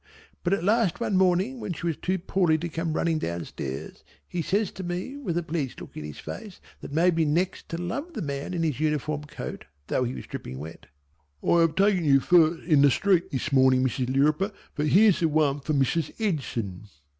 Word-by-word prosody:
But 175 - +1
at 195 - 0
last 215 -1 +2
one 225 -4 0
morning 190 +7 +2
when 185 - -4
she 170 - -7
was 165 -2 0
too 185 +5 -1
poorly 175 -2 +2
to 170 +2 -4
come 165 0 -2
running 160 -1 +1
down 85 - -3
stairs 70 0 -6 0.2
he 175 - -3
says 200 +5 0
to 190 - -7
me 180 +9 -4
with 215 -13 -3
a 175 - 0
pleased 155 -5 -3
look - - -11
in - - -6
his 75 -1 -8
face 210 -5 -8 0.2
that - - -9
made 170 +3 +3
me 165 - +4
next 165 +5 -1
to 165 - -3
love 280 - -4
the - - -4
man 140 +4 -4
in 165 - 0
his 150 -5 -1
uniform 150 -1 -1
coat 150 - -7 0.2
though 130 - +1
he 125 +1 -3
was - - -7
dripping 65 +1 -7
wet 75 -1 -9 0.6
"I 170 - +5
have 165 -1 +2
taken 195 -2 +3
you 140 -3 +5
first 165 +2 +4
in 155 -5 +4
the 145 - +7
street 185 +5 +2
this 140 +2 -3
morning 130 -1 +5
Mrs. 130 0 0
Lirriper, 150 +9 +2 0.2
for 150 - -1
here's 195 +5 +5
the 165 - +3
one 145 -2 +2
for 155 +2 -2
Mrs. 140 +4 +1
Edson." 120 - -2
165 Hz, 215 wpm, -26 LUFS, 140-185 Hz, 0.6 s, the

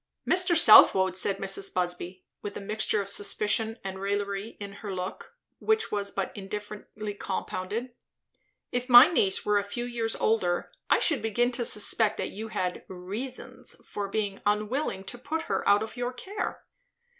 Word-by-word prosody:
"Mr. 365 -2 +4
Southwode," 190 - +7
said 195 +1 +2
Mrs. 195 0 -2
Busby, 180 0 -3 0.2
with 205 -1 -6
a - - -5
mixture 210 +1 -1
of 200 - -7
suspicion 215 +3 0
and 190 0 -6
raillery 200 +1 -3
in 200 -1 -7
her 205 - -5
look, 185 0 -6 0.2
which 440 0 +1
was 200 -1 -1
but 195 - -3
indifferently 210 +1 -7
compounded, 205 +4 -4 0.8
"if 245 +1 -3
my 245 +2 +11
niece 250 - +1
were 210 0 +3
a - - -3
few 205 +4 -5
years 235 -2 -3
older, 180 -6 0 0.2
I - - +5
should 300 -9 +1
begin 240 +3 +1
to 240 0 -2
suspect 215 0 +3
that - - -4
you 220 +3 -7
had 180 -4 -3
reasons 200 +8 -7
for 205 -1 -5
being 200 -1 -3
unwilling 210 +2 -1
to 240 +5 -8
put 315 +5 -3
her 195 -6 -1
out 205 +1 +4
of 220 - -8
your 245 0 -3
care." 390 - -5
210 Hz, 165 wpm, -27 LUFS, 195-240 Hz, 0.8 s, my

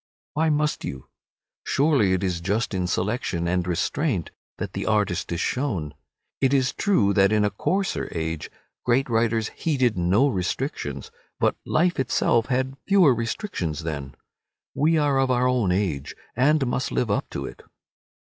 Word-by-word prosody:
Why 160 +2 +2
must 150 0 0
you? 65 -2 -6 0.5
Surely 135 -10 +3
it 95 0 0
is 90 -3 -1
just 105 +6 -1
in 90 -2 -1
selection 90 -2 -1
and 90 0 0
restraint 90 - -1 0.3
that - - -5
the - - -3
artist 105 -6 0
is 85 - -1
shown. 95 - -1 0.5
It 135 +1 +3
is 130 -2 +2
true 115 - +2
that 100 0 +4
in 105 -1 +3
a 105 - 0
coarser 195 - -1
age 80 -1 -3 0.3
great 125 +2 +2
writers 115 -1 +1
heeded 130 - 0
no 95 +10 +3
restrictions, 90 - -3 0.3
but - - +2
life 175 +1 +2
itself 120 -2 +2
had 130 +1 -1
fewer 190 -9 +6
restrictions 115 - -3
then. 70 -5 -5 0.6
We 160 +3 +2
are 145 -3 +2
of 135 -1 +2
our 125 0 +2
own 125 -7 +2
age, 90 -8 -1 0.2
and 140 +4 +3
must 125 +1 -1
live 115 -4 0
up - - -1
to - - -4
it. - - -9
115 Hz, 155 wpm, -24 LUFS, 90-135 Hz, 0.6 s, fewer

